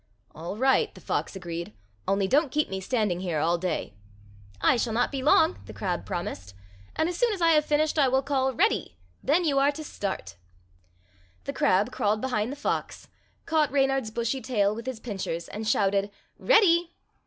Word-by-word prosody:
"All 170 +6 -6
right," 265 +3 +3
the - - -11
fox - - -3
agreed; 170 - -6 0.3
"only 195 0 +1
don't 290 +6 +3
keep 300 0 0
me 190 0 -3
standing 210 -5 0
here 175 -4 -2
all 170 +3 +1
day." 180 - -3 0.7
"I - - +4
shall 235 -1 -1
not 240 +2 +1
be 275 -2 -3
long," 100 - +4
the - - -10
crab - - -3
promised; 95 0 -5 0.4
"and 315 - +1
as 350 - -3
soon 480 +4 +2
as 395 - -5
I 335 -1 +4
have 305 -1 +4
finished 305 +1 +1
I 275 - +5
will 265 +1 +2
call, 265 -2 +1
'Ready!' 90 - 0 0.2
Then 325 +6 +2
you 280 -3 +2
are 280 +1 +4
to 310 - -7
start." 200 - -5 1.1
The - - -4
crab 190 +3 +2
crawled 215 -3 0
behind 240 -2 -1
the - - -5
fox, 290 - -3 0.4
caught 315 -3 +2
Reynard's 270 -4 +1
bushy 235 +4 -2
tail 210 -4 +1
with 230 +3 -8
his 255 -4 -4
pincers 190 -7 -4
and 215 +1 -5
shouted, 200 -1 +2 0.3
"Ready!" 350 -7 +4
245 Hz, 185 wpm, -27 LUFS, 195-290 Hz, 1.1 s, I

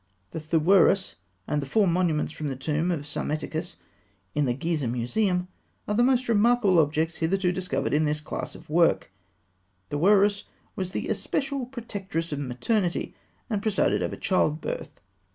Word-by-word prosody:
The - - -4
Thûeris, 170 +5 +3 0.3
and 150 - 0
the 140 - -6
four 205 +9 +3
monuments 170 -3 +1
from 155 - -4
the 135 - -3
tomb 150 +6 -1
of 170 -5 -1
Psammetichus 155 - -3 0.6
in 150 - +1
the 120 -2 0
Gizeh 150 -3 -1
Museum, 180 - 0 0.4
are 210 - 0
the 225 - +3
most 255 0 +3
remarkable 225 -4 +4
objects 160 +2 +1
hitherto 180 +2 +1
discovered 180 -4 -2
in 155 +1 +3
this 150 0 0
class 150 - -5
of - - -13
work. 165 - +2 0.8
Thûeris 200 +6 +4
(fig. - - -9
203) - - -27 0.3
was 185 -1 -3
the - - -2
especial 275 -3 -2
protectress 200 -10 -5
of 145 - -2
maternity, 170 - -1 0.3
and 210 -4 -1
presided 215 -2 +1
over - - -2
childbirth. 155 - -1
175 Hz, 155 wpm, -26 LUFS, 150-205 Hz, 0.8 s, remarkable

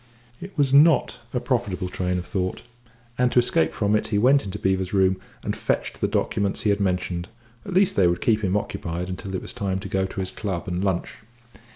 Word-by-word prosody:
It 190 0 -9
was 140 -2 +2
not 150 0 +5
a 125 - 0
profitable 110 -8 -1
train 90 0 -1
of 90 - -4
thought, 95 0 -3 0.6
and, 125 -1 +3
to - - -2
escape 80 -10 +3
from 105 0 +1
it, 105 - 0
he 105 - 0
went 135 +6 +4
into 95 -2 -5
Beevor's 95 -1 0
room 95 -1 +3 0.2
and - - -2
fetched - - -2
the - - +2
documents 100 -1 0
he 105 - +2
had 100 - +1
mentioned 90 -2 -1 0.4
at 195 - -4
least 190 0 +4
they 95 -3 +5
would 85 0 +1
keep 110 -2 +1
him 95 +1 +2
occupied 90 -3 -4
until 95 +1 -5
it - - -3
was - - -7
time 95 -2 -2
to 95 - -6
go 95 0 0
to 95 - -7
his 95 0 -2
club 95 -5 -4
and 90 +1 -2
lunch. 95 -3 -1
95 Hz, 220 wpm, -24 LUFS, 90-110 Hz, 0.6 s, not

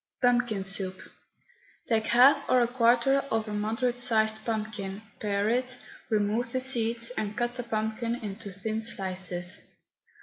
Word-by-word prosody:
PUMPKIN 245 -5 +2
SOUP. 190 -1 0 0.9
Take 220 -2 0
half 270 +4 +5
or 255 - +5
a 240 - +3
quarter 245 +2 +3
of 225 0 -1
a 210 - -4
moderate 225 +4 -1
sized 220 -2 +1
pumpkin, 215 -3 -4 0.2
pare 205 -1 0
it, 250 +3 0 0.3
remove 220 +2 0
the 260 - +1
seeds, 235 -2 +1
and 210 -4 -4
cut 240 0 0
the 250 - -4
pumpkin 225 0 -2
into 210 -2 -7
thin 215 +3 -3
slices. 185 -4 0
220 Hz, 140 wpm, -28 LUFS, 210-240 Hz, 0.9 s, half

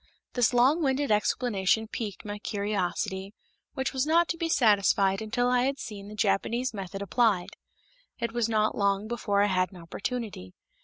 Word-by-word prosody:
This 245 -3 +3
long 260 +7 +4
winded 275 -2 +1
explanation 210 0 +1
piqued 215 -3 -6
my 205 0 -5
curiosity, 200 -1 -2 0.4
which 265 -1 -2
was 265 +2 0
not 335 +2 +4
to - - 0
be 330 0 -2
satisfied 200 -6 +3
until 245 +3 0
I 250 0 +3
had 275 +1 -1
seen 200 -5 -8
the 210 - -9
Japanese 230 +4 0
method 195 -1 -5
applied. 200 -4 +2 0.7
It 235 - -2
was 235 -1 0
not 215 -1 +1
long 200 +1 +1
before 205 -3 +1
I - - +4
had 185 -2 +1
an 190 - -12
opportunity. 195 - -5
215 Hz, 165 wpm, -28 LUFS, 200-245 Hz, 0.7 s, long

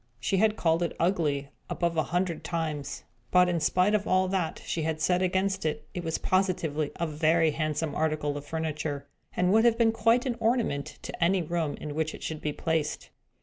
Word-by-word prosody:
She 190 +11 0
had 215 +2 +3
called 165 -4 +2
it 170 - -1
ugly, 150 -6 +1 0.2
above 170 -1 -1
a 160 - +3
hundred 175 -1 -1
times; 155 -5 -3 0.3
but, 180 0 +5
in 175 -1 +1
spite 180 +6 +2
of 210 -1 +1
all 185 0 +3
that 185 -4 -1
she 165 - -2
had 160 0 -1
said 180 +3 +2
against 190 +1 0
it, 150 -1 -2
it 175 - -4
was 160 -1 -1
positively 170 -6 0
a 170 - -1
very 160 +1 +2
handsome 155 0 -2
article 155 -2 0
of 145 - -5
furniture, 150 -2 -3 0.3
and 180 +1 +2
would 220 +1 +5
have 235 -1 +4
been 230 -1 +4
quite 230 +3 +3
an 245 -3 -1
ornament 225 - 0
to 175 - -3
any 180 +1 +3
room 165 -2 -1
in 150 - -6
which 160 +1 -1
it - - -11
should 155 -1 -4
be 150 - -1
placed. 160 0 -2
165 Hz, 200 wpm, -28 LUFS, 155-185 Hz, 0.3 s, but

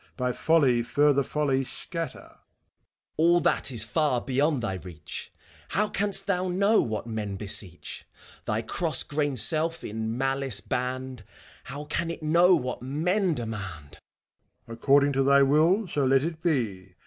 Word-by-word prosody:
By 125 -1 -1
folly 140 -7 +3
further 145 +3 +2
folly 140 -1 0
scatter! 165 +5 -6
FAUST. - - -24 0.8
All 170 +2 +4
that 165 -4 +1
is 115 -4 +2
far 130 +3 0
beyond 135 +1 0
thy 95 -5 -2
reach. 85 -4 -9 0.4
How 210 +1 0
canst 200 0 0
thou 185 -2 0
know 200 +5 +3
what 110 -1 -3
men 110 -3 -4
beseech 100 -3 -2
f - - -22
Thy - - -1
cross - - 0
grained 145 -2 -2
self, 160 +8 +2
in 110 +2 -4
malice 135 -4 0
banned, 130 +1 -4 0.4
How 145 +2 -7
can 165 +3 -2
it 165 -1 -6
know 170 +4 +5
what 125 -4 -4
men 170 +7 0
demand? 100 - -7 0.7
MEPHISTOPHELES. - - -24
According 140 +4 +3
to 135 - +1
thy 140 +1 +5
will 165 +9 +3
so 145 -4 -1
let 135 +1 +3
it 160 0 -4
be 105 - -2
135 Hz, 155 wpm, -26 LUFS, 115-160 Hz, 0.8 s, know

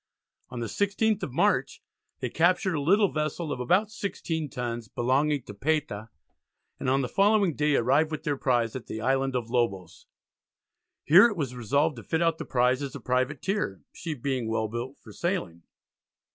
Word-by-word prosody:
On 120 - -6
the - - -2
16th 205 - 0
of - - -4
March - - +1 0.4
they - - -1
captured 180 +2 +2
a 150 - -1
little 195 +6 +3
vessel 155 +1 -2
of - - -3
about 185 - +2
16 165 -7 -3
tons 120 -3 -4
belonging 135 +4 +1
to 100 - -9
Payta, 135 -4 -2 0.7
and - - -1
on 135 +1 +3
the - - -1
following 200 - +3
day 150 0 +1
arrived 135 +6 +3
with 155 -1 -5
their 150 -3 0
prize 120 -4 0
at 130 - -7
the 110 - -5
Island 135 +2 0
of 120 -2 -3
Lobos. 100 -8 -2 1.0
Here 180 +9 +8
it 215 -5 -4
was 135 -6 -2
resolved 140 +5 +1
to 115 - -8
fit 160 - -1
out 165 -1 +1
the - - -4
prize 125 +1 +2
as 140 -2 -5
a - - -6
privateer, 130 - -1
"she 165 -3 -5
being 130 -2 -2
well 110 0 0
built 120 +5 -5
for - - -14
sailing." 170 - -2
140 Hz, 180 wpm, -27 LUFS, 120-165 Hz, 1.0 s, Here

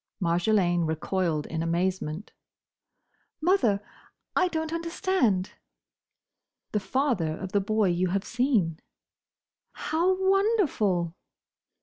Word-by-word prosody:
Marjolaine 175 -1 +2
recoiled 160 -1 -1
in 160 0 -3
amazement. 170 +1 -2 1.1
"Mother!—I 315 - 0
don't 320 -2 -3
understand!" 335 - 0 1.2
"The 210 - +1
father 200 - 0
of 190 -1 -6
the 205 - +2
boy 215 0 +1
you 175 +1 +1
have 195 +2 -1
seen!" 230 - +1 0.9
"How 345 +4 +1
wonderful!" 325 - +2
200 Hz, 85 wpm, -27 LUFS, -, 1.2 s, Marjolaine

